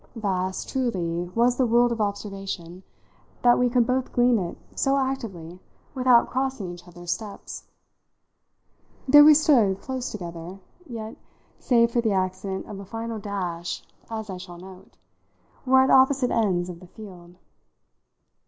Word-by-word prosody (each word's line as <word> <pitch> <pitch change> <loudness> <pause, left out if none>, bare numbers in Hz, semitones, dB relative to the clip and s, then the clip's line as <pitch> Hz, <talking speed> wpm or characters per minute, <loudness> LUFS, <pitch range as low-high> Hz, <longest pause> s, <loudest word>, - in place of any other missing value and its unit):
Vast, 190 -4 -2
truly, 175 -10 -2
was 240 +1 +3
the 260 - +3
world 240 +1 +3
of 230 -2 -2
observation, 195 -4 -4 0.6
that 240 0 +5
we 250 0 +3
could 240 -1 +3
both 255 +1 -1
glean 245 -2 +3
in 185 - -2
it 170 - -7 0.2
so 275 0 +1
actively 200 -11 -4 0.3
without 255 -2 +4
crossing 260 -8 -2
each 175 +1 -13
other's 175 0 -7
steps. 210 -3 -6 1.4
There 295 +2 +9
we 305 0 +8
stood 235 -11 +3
close 260 +1 -4
together, 175 -1 -8 0.3
yet 225 -2 -7 0.4
save 235 -2 +3
for 240 - +1
the 220 -3 +1
accident 190 0 -2
of 200 - -8
a 200 - -9
final 225 +2 -5
dash, 180 -5 -4 0.3
as 220 -2 -5
I 185 - -5
shall 180 -1 -10
note 185 +1 -14 0.7
were 260 0 +6
at 265 - +3
opposite 265 -1 +4
ends 185 -6 +1
of 175 -2 -8
the 180 - -14
field. 180 -4 -13
215 Hz, 150 wpm, -25 LUFS, 185-245 Hz, 1.4 s, There